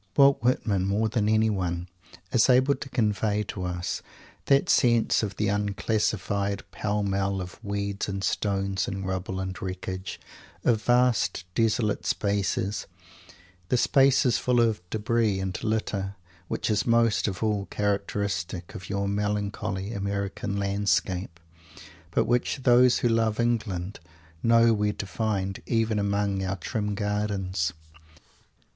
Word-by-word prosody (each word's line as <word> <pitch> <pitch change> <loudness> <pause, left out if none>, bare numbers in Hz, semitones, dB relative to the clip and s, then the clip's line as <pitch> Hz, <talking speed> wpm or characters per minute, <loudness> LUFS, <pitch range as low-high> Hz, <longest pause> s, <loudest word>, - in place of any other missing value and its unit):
Walt 140 -1 +6
Whitman, 105 -6 +1
more 105 +3 +1
than 105 -1 +1
anyone, 95 -6 +1 0.4
is 120 +1 +4
able 130 +2 +5
to 135 +1 -7
convey 105 -3 +1
to 95 -3 -5
us 90 0 -3 0.4
that 140 0 +4
sense 120 -2 +3
of 105 -3 -3
the 105 - 0
unclassified 100 -1 -1
pell 105 0 -1
mell, 100 0 0
of 90 +4 -8
weeds 100 -1 -2
and 95 0 -3
stones 100 -1 0
and 95 0 -4
rubble 95 0 -3
and 95 -1 -5
wreckage, 95 0 -5 0.4
of 110 -3 +2
vast, 120 -4 +2
desolate 110 -1 +1
spaces, 100 0 -1 0.8
and 125 - +2
spaces 135 -2 +4
full 125 -1 +2
of 115 -5 +2
debris 110 -1 +1
and 95 +1 -4
litter, 105 -3 -1 0.3
which - - -1
is 105 +1 +1
most 115 -2 +3
of 95 +1 -3
all 105 -2 0
characteristic 100 -4 -2
of 90 - -8
your 100 0 -1
melancholy 100 0 -2
American 100 0 -3
landscape, 100 -3 0 0.7
but 80 - +1
which 125 +2 0
those 125 0 +6
who - - +6
love 115 -1 +1
England 105 -6 -1 0.4
know 115 0 +5
where 105 -1 +1
to 100 - -5
find, 95 -1 -2
even 110 -2 +1
among 100 -1 0
our 95 +1 -1
trim 105 +3 -3
gardens! 100 -5 -1
105 Hz, 130 wpm, -26 LUFS, 95-110 Hz, 0.8 s, Walt